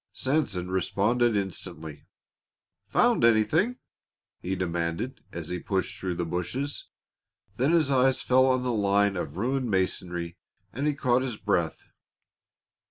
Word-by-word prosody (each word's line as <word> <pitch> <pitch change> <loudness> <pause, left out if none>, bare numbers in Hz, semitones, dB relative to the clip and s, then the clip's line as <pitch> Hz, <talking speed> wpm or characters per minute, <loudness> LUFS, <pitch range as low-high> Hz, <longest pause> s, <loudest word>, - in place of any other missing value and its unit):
Sanson 120 - -1
responded 110 +5 +1
instantly 85 -6 -5 0.8
"Found - - +3
anything?" 150 - +3 0.6
he 95 +2 -3
demanded, 85 +7 -2
as 85 -2 -6
he 90 - -3
plunged 95 +1 -2
through 90 -2 -2
the 85 0 -2
bushes. 90 - -3 0.7
Then 135 +6 +2
his 160 -5 +3
eyes 130 0 +3
fell 130 +1 +4
on 130 -1 +2
the 125 - 0
line 100 -1 +2
of 80 -3 -4
ruined 130 +4 -1
masonry 90 -3 -2 0.3
and 140 +5 -1
he 150 - +1
caught 125 -2 +2
his 125 -4 -3
breath. 85 -5 -1
100 Hz, 130 wpm, -27 LUFS, 90-130 Hz, 0.8 s, fell